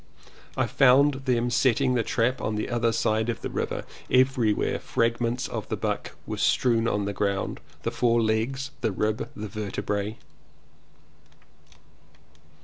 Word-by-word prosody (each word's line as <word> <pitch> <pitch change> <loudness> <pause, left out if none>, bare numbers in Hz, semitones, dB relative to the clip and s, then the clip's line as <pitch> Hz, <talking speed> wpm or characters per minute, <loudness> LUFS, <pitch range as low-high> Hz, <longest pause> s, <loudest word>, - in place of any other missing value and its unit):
I - - +2
found 135 +1 +4
them 120 -2 +1
setting 130 +1 +3
the 120 - +2
trap 120 +4 0
on 110 - -1
the 105 +3 -3
other 120 -1 +2
side 110 0 +1
of 115 - -3
the - - -4
river; - - -3 0.2
everywhere 125 -4 +2
fragments 115 +2 0
of - - -5
buck - - -3
were - - -4
strewn 115 -3 +2
on 105 -3 0
the 100 - -2
ground, 100 -1 -1 0.2
the - - -1
four 120 -1 +2
legs, 115 +5 0
the 115 - +1
ribs, 105 +3 -1
the 105 0 -5
vertebrae. 105 +1 -3
115 Hz, 140 wpm, -26 LUFS, 110-125 Hz, 0.2 s, found